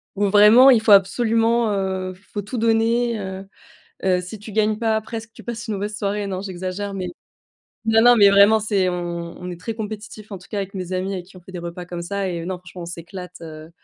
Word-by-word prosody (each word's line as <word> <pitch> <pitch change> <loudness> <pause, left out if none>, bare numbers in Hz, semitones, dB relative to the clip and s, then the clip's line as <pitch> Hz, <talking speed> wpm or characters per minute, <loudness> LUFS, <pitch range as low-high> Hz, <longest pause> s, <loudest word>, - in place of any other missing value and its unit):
Où 205 +1 +1
vraiment, 210 +6 +8
il 240 -5 +6
faut 220 - +2
absolument, 225 +3 +3
heu, 190 -1 -2
f 180 - -19
faut 205 - -2
tout 230 +6 -6
donner, 230 +1 +2
heu 190 0 -6 0.6
heu, 185 -1 +2
si 185 +4 -9
tu 215 +2 -10
gagnes 215 0 +1
pas 220 -2 +1
presque 225 +1 -8
tu - - -13
passes 235 -1 -6
une 210 - -1
mauvaise 205 +2 -4
soirée. 205 0 -2
Non, 190 -1 -4
j'exagère, 190 +1 -5
mais, 185 -2 -3 0.8
non 225 0 +4
non, 245 0 +7
mais 200 -2 +7
vraiment, 200 +2 +6
c'est 205 -3 +1
on 170 -1 -5
on 180 - -6
est 175 - -6
très 225 +5 -4
compétitifs 215 -1 -7
en 195 - -5
tout 180 - -17
cas 210 - -4
avec 195 -1 -4
mes 185 -2 -5
amis 185 +1 -2
avec 180 -2 -5
qui 190 -1 -15
on - - -14
fait 185 +2 -14
des 180 - -5
repas 175 +1 -7
comme 175 -1 -6
ça 195 +2 -3
et 175 -2 -3
heu, - - -7
non 185 0 -3
franchement, 180 0 -11
on - - -6
s'éclate. 175 +1 -8
Heu, 155 -1 -10
200 Hz, 245 wpm, -22 LUFS, 185-220 Hz, 0.8 s, vraiment